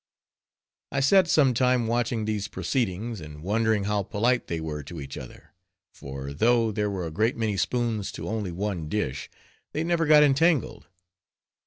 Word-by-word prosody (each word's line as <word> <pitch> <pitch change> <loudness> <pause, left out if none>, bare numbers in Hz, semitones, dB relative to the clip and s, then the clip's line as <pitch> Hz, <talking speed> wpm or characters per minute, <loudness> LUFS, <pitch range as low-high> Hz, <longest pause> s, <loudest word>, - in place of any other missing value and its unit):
I 135 - 0
sat 170 +7 +5
some 140 -6 +4
time 125 0 +2
watching 115 -1 0
these 105 -2 -2
proceedings, 105 +1 -2
and 75 0 -10
wondering 110 +1 +1
how 105 0 0
polite 120 +6 0
they 85 - -3
were 75 -2 -4
to 80 +4 -9
each 70 -1 -7
other; 65 - -11 0.4
for, 70 0 -7
though 115 +6 +3
there 105 0 -1
were 95 -3 -3
a 80 - -5
great 110 +8 0
many 110 -3 0
spoons 110 +1 -1
to - - -6
only 105 -4 -3
one 90 -3 -3
dish, 70 -11 -2 0.4
they 155 - -1
never 165 -1 +1
got 150 -1 +7
entangled. 150 0 +2
110 Hz, 165 wpm, -26 LUFS, 90-125 Hz, 0.4 s, got